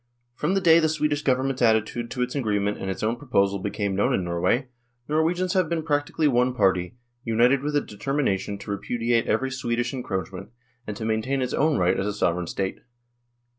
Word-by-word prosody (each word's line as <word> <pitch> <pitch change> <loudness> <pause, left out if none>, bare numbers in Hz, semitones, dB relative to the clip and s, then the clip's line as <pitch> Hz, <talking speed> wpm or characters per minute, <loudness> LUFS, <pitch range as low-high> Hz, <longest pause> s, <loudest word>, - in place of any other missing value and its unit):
From 150 +9 -1
the 195 - +2
day 165 -2 +6
the 160 -1 +2
Swedish 150 -1 0
Government's 130 -1 0
attitude 115 +1 +2
to 125 - -1
its 125 - -4
agreement 105 -6 -1
and 95 - -4
its 95 - -4
own 115 +3 0
proposal 100 -8 +1
became 100 0 -2
known 100 - +2
in 95 - -1
Norway, 90 +9 0 0.4
Norwegians 170 +4 +1
have 185 -4 +2
been 165 -2 -1
practically 150 0 0
one 125 -1 +2
party, 95 -1 +1 0.3
united 120 +3 +3
with 145 +1 -2
a 145 - +3
determination 105 -4 -2
to 100 - -7
repudiate 115 +3 0
every 130 +5 0
Swedish 120 -1 -2
encroachment, 95 -7 -4 0.4
and 105 -1 -5
to 110 - -4
maintain 115 +5 0
its 125 - -3
own 155 0 +2
right 90 +1 +2
as 100 - -1
a 105 - -1
Sovereign 90 -3 0
State. 95 +1 -3
120 Hz, 190 wpm, -25 LUFS, 100-145 Hz, 0.4 s, day